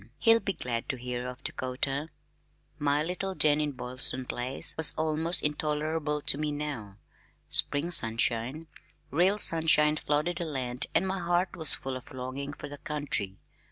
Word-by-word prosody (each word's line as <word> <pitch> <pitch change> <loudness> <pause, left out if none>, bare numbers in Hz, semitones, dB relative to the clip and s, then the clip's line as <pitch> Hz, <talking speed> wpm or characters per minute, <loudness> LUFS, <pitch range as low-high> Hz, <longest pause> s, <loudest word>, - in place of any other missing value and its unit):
He'll 225 0 +4
be 195 - -4
glad 120 -6 -5
to 130 - -2
hear 125 0 -6
of 125 +2 -10
Dakota." 135 +4 -4 0.7
My 145 +1 +1
little 185 +3 -4
den 150 -2 +3
in 150 -1 -3
Boylston 130 +1 -2
Place 125 +2 0
was 160 -1 +6
almost 160 +2 0
intolerable 150 0 -2
to 140 - +1
me 150 -1 -2
now. 140 -10 -6 0.5
Spring 150 +5 +7
sunshine, 120 +1 -1 0.5
real 180 +7 +2
sunshine 155 -4 +5
flooded 150 +4 -1
the 175 - -1
land 130 -3 -5
and 190 - +2
my 190 0 -3
heart 175 +1 -1
was 160 -4 +5
full 135 -1 -6
of 130 - -11
longing 130 +2 -6
for 145 - -9
the 145 0 -11
country. 140 -10 -4
150 Hz, 160 wpm, -27 LUFS, 130-160 Hz, 0.7 s, Spring